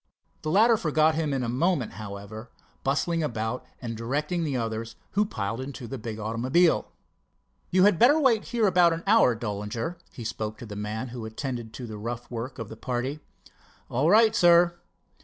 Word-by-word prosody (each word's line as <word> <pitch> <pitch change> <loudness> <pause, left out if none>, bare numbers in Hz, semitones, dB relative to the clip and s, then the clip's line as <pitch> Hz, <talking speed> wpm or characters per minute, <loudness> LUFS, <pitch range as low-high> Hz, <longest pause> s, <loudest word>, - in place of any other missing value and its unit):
The 155 - -3
latter 225 +7 +5
forgot 155 -3 +2
him 155 -2 -1
in 135 -2 -1
a - - -2
moment, 135 +1 0
however, 105 +2 -8 0.3
bustling 165 +5 0
about 115 -4 -2 0.2
and 115 -2 -5
directing 145 +9 -2
the 140 -5 -1
others, 115 -1 -3 0.2
who 210 +2 +2
piled 115 - -3
into 130 -2 -7
the 135 +2 -6
big 110 -1 -5
automobile. 125 +11 +2 0.8
"You 185 +1 +4
had 200 -4 +4
better 285 +6 +6
wait 240 -7 +3
here 230 -2 +1
about 175 -3 +5
an 165 +1 -5
hour, 200 - +5
Dollinger," 110 - -4
he 120 - -8
spoke 110 -1 -4
to - - -9
the 105 -2 -8
man 105 +4 -4
who 120 -1 -7
attended 115 0 -5
to 125 - -7
the 110 -2 -7
rough 120 +3 -5
work 120 +2 -5
of 115 -4 -5
the 110 - -9
party. 130 +4 -3 0.7
"All 135 +7 +2
right, 220 +2 +5
sir." 175 -3 +5
130 Hz, 180 wpm, -27 LUFS, 115-170 Hz, 0.8 s, better